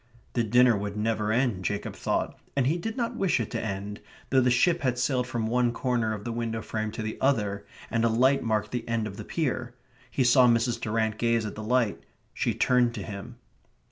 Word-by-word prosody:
The 120 - +1
dinner 120 +2 +5
would 100 +1 -4
never 110 0 0
end, 115 -5 +1
Jacob 100 +2 -3
thought, - - -1 0.2
and 135 -3 +2
he 160 +6 +1
did 225 +6 -4
not 240 -1 -1
wish 195 - +1
it 115 - -3
to - - -2
end, 100 0 -4 0.3
though 130 -1 +5
the 125 - +3
ship 170 +8 +3
had 130 -3 0
sailed 125 0 0
from 120 -3 -2
one 120 +1 +2
corner 120 -2 0
of 100 - -8
the 120 - -3
window 115 -1 -3
frame 110 -1 -3
to 110 - -4
the 110 0 -5
other, 105 -7 0 0.2
and 115 -1 +1
a 115 - +4
light 130 +5 +3
marked 110 -2 -1
the 125 -2 -3
end 115 -1 0
of 100 -2 -7
the - - -6
pier. 125 -6 -2 0.3
He 135 - +1
saw 125 +1 +6
Mrs. 120 0 +2
Durrant 110 0 -1
gaze 115 -1 +2
at 105 - -4
the 110 - -7
light. 115 0 +1 0.3
She - - -1
turned 125 -2 +3
to - - -5
him. 100 -2 -7
115 Hz, 220 wpm, -27 LUFS, 110-125 Hz, 0.3 s, saw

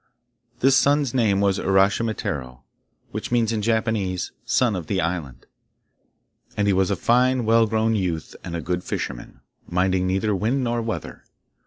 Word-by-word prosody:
This 135 +1 +5
son's 140 -1 +3
name 105 -6 +2
was 100 -1 +2
Uraschimataro, 95 - 0 0.5
which - - -5
means 115 -2 +2
in 110 - -1
Japanese, 110 -5 -1
'Son 120 -5 +1
of 85 -4 -5
the 95 - 0
island,' 80 -7 -3 1.1
and 105 - +1
he 100 - +3
was 95 +1 +2
a 100 - +1
fine 125 +4 +2
well 115 0 +4
grown 110 +1 +1
youth 90 -6 -2
and 85 - -5
a 85 - -3
good 90 +3 -2
fisherman, - - -5 0.3
minding 90 +1 +1
neither 95 +3 0
wind 120 +8 0
nor 120 -1 -1
weather. 115 0 -5
100 Hz, 155 wpm, -23 LUFS, 90-115 Hz, 1.1 s, This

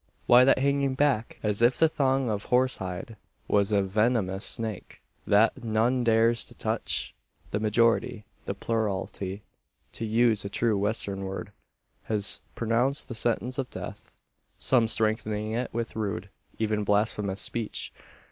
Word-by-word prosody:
Why 125 +1 +7
that 135 - +5
hanging 140 0 +1
back, 130 -5 +1
as 105 0 +1
if 120 +2 +4
the 160 - +5
thong 135 -4 +1
of 105 -2 -2
horse 125 +1 +2
hide 95 +4 -6 0.3
was 100 0 +2
a 100 -1 +3
venomous 100 -1 0
snake, 110 -4 -3 0.3
that 110 +3 +3
none 115 +3 +1
dares 115 0 +3
to - - -11
touch? - - -2 0.4
The 105 - -1
majority 110 0 +1 0.2
the - - -3
plurality, 100 -3 -3 0.5
to - - -7
use 115 -1 +2
a 100 - -4
true 110 +2 +1
Western 100 -1 -1
word 95 0 -6 0.5
has 105 -2 -1 0.2
pronounced 120 +5 0
the - - -4
sentence 120 +3 0
of 130 - -2
death; - - -8 0.4
some 120 -4 +3
strengthening 110 -1 0
it 120 +3 -2
with 115 0 -4
rude, 100 -3 -3 0.3
even 105 -1 0
blasphemous, 105 -1 0
speech. 115 -3 -3
110 Hz, 145 wpm, -27 LUFS, 105-120 Hz, 0.5 s, Why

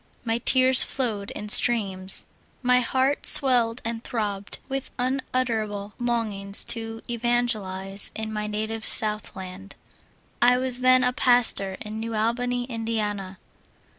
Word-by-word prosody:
M3 230 +1 -2
tears 260 -1 +5
flowed 215 -7 -3
in 210 - -7
streams; 195 -5 +4 0.4
my 250 0 +4
heart 260 +3 0
swelled 245 -4 +5
and 230 0 -4
throbbed 205 -3 -4
with 270 -1 -5
unutterable 235 -5 -2
longings 215 -5 -2
to 225 -1 -6
evan 240 +1 0
gelize 195 -3 -3
in 220 0 -5
my 210 0 -3
native 220 +1 -4
Southland. 195 -3 0 0.7
I 245 +1 +5
was 255 -1 0
then 255 0 +4
a 250 0 +1
pastor 235 -7 +2
in 215 0 -7
New 225 0 -4
Albany, 245 +3 -1
Indiana. 215 -5 -4
225 Hz, 125 wpm, -24 LUFS, 210-245 Hz, 0.7 s, tears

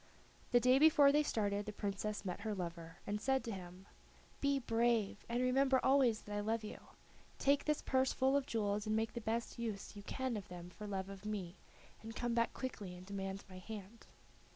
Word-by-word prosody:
The 245 - +6
day 255 +2 +5
before 300 -2 +7
they 295 +1 +4
started 205 -7 0
the - - -2
Princess 205 0 -3
met 180 0 -3
her 215 0 -2
lover 170 -2 -5
and 210 +1 -2
said 265 +2 +2
to 230 - -4
him: 185 -1 -8 0.5
"Be 280 0 +2
brave, 230 -4 +1
and 240 +2 +1
remember 260 +1 +4
always 260 -5 +4
that 205 - -5
I - - 0
love 220 +2 0
you. 210 - -6 0.6
Take 280 +1 +3
this 300 -1 +1
purse 260 0 +2
full 265 +1 +2
of 280 -1 +1
jewels 210 -1 0
and 215 - +2
make 225 0 0
the 235 - -4
best 230 +2 -2
use 215 -3 -4
you 205 - -7
can 255 +2 -2
of 200 - -7
them 175 0 -8
for 210 +3 -8
love 190 -2 -2
of 195 0 -9
me, 200 -5 -3 0.5
and 225 0 -8
come 240 +1 -1
back 230 0 +2
quickly 205 -8 -5
and 180 +1 -11
demand 195 0 -4
my 185 -1 -10
hand." 215 +2 -9
215 Hz, 205 wpm, -37 LUFS, 200-255 Hz, 0.6 s, before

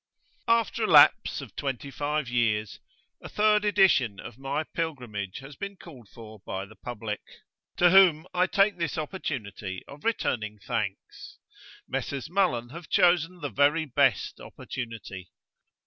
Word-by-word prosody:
AFTER 230 0 +2
a - - -1
lapse - - +6
of - - -11
twenty 140 -1 -4
five 150 0 -2
years, 110 -3 0 0.4
a - - -9
third 210 0 +3
edition 190 - +3
of 120 - -9
my 135 +3 -2
Pilgrimage 125 - -4
has 135 +1 -11
been 200 +4 -6
called 130 - -14
for 110 -2 -12
by 95 -1 -5
the 110 +2 -16
public, 110 -3 -6 0.6
to 175 -1 +5
whom 180 -4 +6
I 180 +1 +2
take 195 0 +2
this 170 -1 -2
opportunity 110 - -5
of 145 +1 -12
returning 110 - -1
thanks. 95 - -5 0.5
Messrs. 140 +3 -4
Mullan 150 -12 +1
have 170 +2 -10
chosen 175 0 +3
the 145 - -3
very 150 +3 +3
best 130 - +1
opportunity. 110 -7 -8
140 Hz, 140 wpm, -27 LUFS, 115-175 Hz, 0.6 s, lapse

